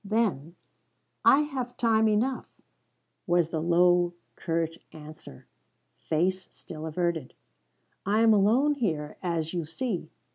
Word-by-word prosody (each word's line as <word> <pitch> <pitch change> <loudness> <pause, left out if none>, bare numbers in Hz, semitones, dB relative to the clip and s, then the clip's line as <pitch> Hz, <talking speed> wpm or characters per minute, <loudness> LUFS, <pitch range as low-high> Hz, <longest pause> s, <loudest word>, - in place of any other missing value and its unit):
Then, 195 -7 -1 0.7
"I 280 - +6
have 265 -5 -4
time 220 -2 +3
enough," 230 +5 0 0.8
was 175 -2 +2
the 160 - -2
low, 175 +1 +3 0.2
curt 165 -1 -2
answer, 155 - -12 0.6
face 180 +4 0
still 160 -1 -9
averted. 165 -3 -2 0.7
"I 210 +3 +1
am 225 -1 +6
alone 230 +9 +3
here, 160 - -3
as 165 -3 -2
you 175 -2 -2
see. 170 - -4
175 Hz, 115 wpm, -27 LUFS, 165-220 Hz, 0.8 s, I